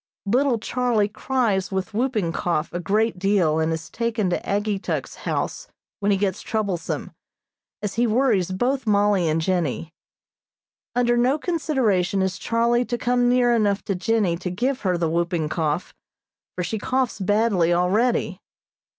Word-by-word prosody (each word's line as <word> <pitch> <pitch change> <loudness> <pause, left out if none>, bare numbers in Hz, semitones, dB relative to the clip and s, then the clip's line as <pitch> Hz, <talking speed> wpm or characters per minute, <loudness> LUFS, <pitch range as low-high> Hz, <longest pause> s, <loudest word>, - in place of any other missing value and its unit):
Little 250 +4 +2
Charlie 230 -2 0
cries 220 -5 0
with 190 +1 -3
whooping 220 -6 0
cough 170 -2 -1
a 175 - -2
great 210 +3 0
deal 180 -5 +2
and 160 0 +1
is 160 0 -4
taken 225 -5 -1
to - - +1
Ageetuk's 205 0 -2 0.2
house - - -2 0.3
when 205 -1 +1
he 195 - +3
gets 190 -2 -1
troublesome, 200 -6 -3 0.7
as 205 -2 -2
he 235 +1 +2
worries 220 -6 +2
both 245 +7 -1
Mollie 205 -4 +3
and 155 +1 +1
Jennie. 165 -2 -1 1.0
Under 240 -1 +3
no 250 +4 +3
consideration 255 - 0
is 185 -2 -2
Charlie 235 +1 +2
to 240 - -2
come 245 0 +2
near 245 -1 +4
enough 205 -3 +1
to 195 - -1
Jennie 190 -2 +1
to 180 +1 -4
give 250 +9 -1
her 185 -3 +1
the 170 -1 0
whooping 170 -1 -1
cough, 155 0 -2 0.6
for 180 - -2
she 215 +5 -3
coughs 255 +1 -1
badly 200 -3 +2
already. 195 +8 +1
205 Hz, 150 wpm, -23 LUFS, 180-240 Hz, 1.0 s, near